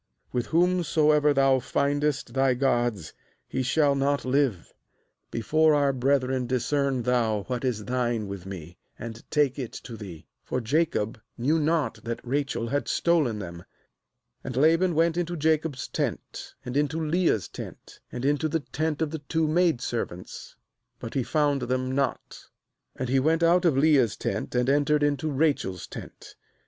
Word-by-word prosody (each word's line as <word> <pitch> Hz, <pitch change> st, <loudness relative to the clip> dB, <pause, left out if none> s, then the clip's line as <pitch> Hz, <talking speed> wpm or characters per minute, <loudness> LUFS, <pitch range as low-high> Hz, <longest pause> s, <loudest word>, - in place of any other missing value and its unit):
32With 120 Hz, -2 st, 0 dB
whomsoever 160 Hz, -4 st, +3 dB
thou 135 Hz, -1 st, +4 dB
findest 140 Hz, -1 st, -1 dB
thy 135 Hz, -1 st, +3 dB
gods, 120 Hz, -, 0 dB, 0.3 s
he -, -, -2 dB
shall 140 Hz, +3 st, +3 dB
not 140 Hz, 0 st, 0 dB
live; 130 Hz, -, 0 dB, 0.6 s
before 155 Hz, +7 st, +3 dB
our 140 Hz, -1 st, +2 dB
brethren 130 Hz, -1 st, +1 dB
discern 130 Hz, +1 st, 0 dB
thou 115 Hz, -4 st, +1 dB
what 125 Hz, +2 st, -4 dB
is 115 Hz, -5 st, -1 dB
thine 120 Hz, -4 st, -1 dB
with 95 Hz, -2 st, -7 dB
me, 85 Hz, -3 st, -9 dB, 0.2 s
and 115 Hz, 0 st, -8 dB
take 145 Hz, -3 st, +1 dB
it 125 Hz, -4 st, -4 dB
to 120 Hz, -, -8 dB
thee.' 95 Hz, -7 st, -9 dB
— -, -, -55 dB
For 130 Hz, -, -2 dB
Jacob 115 Hz, -4 st, 0 dB, 0.2 s
knew 150 Hz, +7 st, +2 dB
not 155 Hz, -1 st, 0 dB
that 115 Hz, -1 st, -3 dB
Rachel 135 Hz, -3 st, -1 dB
had 145 Hz, +3 st, -1 dB
stolen 155 Hz, -10 st, +2 dB
them. 85 Hz, -4 st, -7 dB, 0.4 s
— -, -, -52 dB
^And 125 Hz, -1 st, -5 dB
Laban 165 Hz, +5 st, +3 dB
went 165 Hz, +1 st, +2 dB
into 175 Hz, 0 st, -2 dB
Jacob's 155 Hz, -4 st, 0 dB
tent, -, -, -4 dB
and 125 Hz, -, -5 dB
into 150 Hz, +2 st, +1 dB
Leah's 160 Hz, -, +1 dB
tent, -, -, -10 dB
and 125 Hz, +1 st, -4 dB
into 145 Hz, +2 st, +1 dB
the 160 Hz, 0 st, -1 dB
tent 155 Hz, +2 st, -2 dB
of 150 Hz, -, -3 dB
the 160 Hz, -, -4 dB
two 155 Hz, +2 st, -1 dB
maid 165 Hz, -5 st, +2 dB
servants; 90 Hz, -8 st, -5 dB, 0.4 s
but 115 Hz, -, -7 dB
he 135 Hz, -, +1 dB
found 145 Hz, +1 st, +1 dB
them 130 Hz, +1 st, -1 dB
not. 135 Hz, 0 st, -2 dB, 0.5 s
And 130 Hz, -, -3 dB
he 135 Hz, +2 st, +2 dB
went 160 Hz, +5 st, +2 dB
out 175 Hz, +2 st, +4 dB
of 155 Hz, -6 st, +3 dB
Leah's 140 Hz, -6 st, +4 dB
tent, 100 Hz, +5 st, -3 dB
and 125 Hz, 0 st, +2 dB
entered 145 Hz, +2 st, +3 dB
into 145 Hz, +2 st, 0 dB
Rachel's 140 Hz, -, 0 dB
tent. -, -, -10 dB
135 Hz, 160 wpm, -26 LUFS, 120-155 Hz, 0.6 s, thou